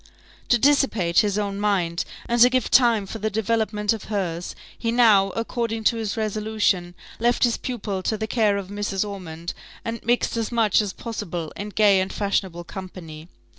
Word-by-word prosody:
To 240 - +5
dissipate 235 -10 +3
his 205 -1 +1
own 200 -1 -2
mind, 185 -5 0 0.2
and 240 0 +1
to 245 - +9
give 255 -1 0
time 235 -5 +5
for 220 +3 -7
the 215 +1 -1
development 215 0 0
of 220 - -7
hers, 180 -5 -3 0.2
he 230 - -2
now, 220 -5 +5
according 230 -1 -2
to 230 +2 +3
his 220 -1 -3
resolution, 215 -4 0 0.2
left 240 +1 +2
his 240 -2 +3
pupil 205 -6 -4
to 220 +3 -1
the 220 - -2
care 215 -3 +2
of 195 -2 -6
Mrs. 205 0 -2
Ormond, 170 -4 -6 0.3
and 230 -1 -4
mixed 240 0 +1
as 225 0 -2
much 225 -4 +3
as 205 -2 -3
possible 180 -8 -5
in 205 +1 -5
gay 205 -2 +4
and 190 - -3
fashionable 190 -4 -2
company. 170 -4 -9
210 Hz, 175 wpm, -23 LUFS, 190-230 Hz, 0.3 s, to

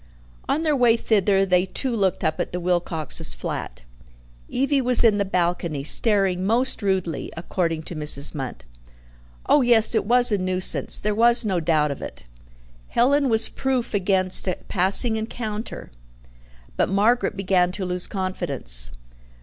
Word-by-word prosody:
On 295 +4 -1
their 305 -2 0
way 240 -3 +3
thither 200 -3 +1
they 180 -1 +2
too 255 +4 -2
looked 195 -4 -1
up 155 -1 -2
at - - -3
the 180 - -3
Wilcoxes' 170 - -2
flat. - - -7 0.7
Evie 275 +2 -1
was 250 -1 +5
in 215 -3 +3
the - - +1
balcony, 170 -5 -2
"staring 195 +1 +2
most 235 +4 +4
rudely," 190 -5 -3
according 165 -2 -3
to 170 - -8
Mrs. 150 -2 +2
Munt. 135 - -7 0.8
Oh 295 - +3
yes, 235 -3 +3
it 220 - 0
was 245 +2 +3
a 205 - 0
nuisance, 185 0 +3
there 210 +1 -2
was 235 +2 +3
no 190 -4 -1
doubt 155 -2 0
of 140 - -8
it. - - -10 0.6
Helen 275 +3 +1
was 225 -1 +5
proof 260 -3 -3
against 190 -1 +3
a 185 - -2
passing 200 +5 +1
encounter 220 0 -6 0.8
but - - -1
Margaret 210 +3 0
began 185 -2 0
to 190 0 -5
lose 180 0 -2
confidence. - - -3
195 Hz, 150 wpm, -22 LUFS, 175-230 Hz, 0.8 s, was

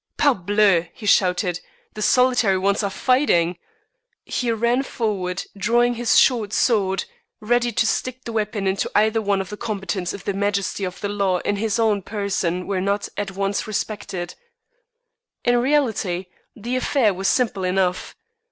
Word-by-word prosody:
"Parbleu," 205 - +3
he 225 - -10
shouted, 180 -2 +2 0.3
"the 215 - -7
solitary 245 -4 +3
ones 200 +2 +1
are 200 - -1
fighting!" 190 - +2 0.7
He 245 -2 -1
ran 235 +3 +1
forward, 195 -8 -2
drawing 240 +4 +2
his 240 0 +2
short 225 -5 +3
sword, 195 -6 +1 0.3
ready 240 +2 +1
to 220 - +2
stick 255 +3 -2
the 230 - -6
weapon 210 -2 -2
into 190 0 0
either 220 +2 +3
of 195 -2 -1
the 210 - -6
combatants 195 -5 -3
if 200 - -8
the 200 - -2
majesty 200 0 -1
of 180 0 -6
the 205 - -2
law 200 -3 +1
in 205 - -1
his 215 0 -1
own 220 -3 +2
person 190 -3 -2
were 195 -2 -1
not 200 +2 -1
at 205 -1 -3
once 195 +2 -2
respected. 200 -4 -4 1.1
In 245 0 +4
reality, 225 -10 0 0.3
the 240 +3 -4
affair 255 -5 +2
was 190 +1 -2
simple 220 -7 +1
enough. 185 0 0
205 Hz, 150 wpm, -22 LUFS, 190-230 Hz, 1.1 s, In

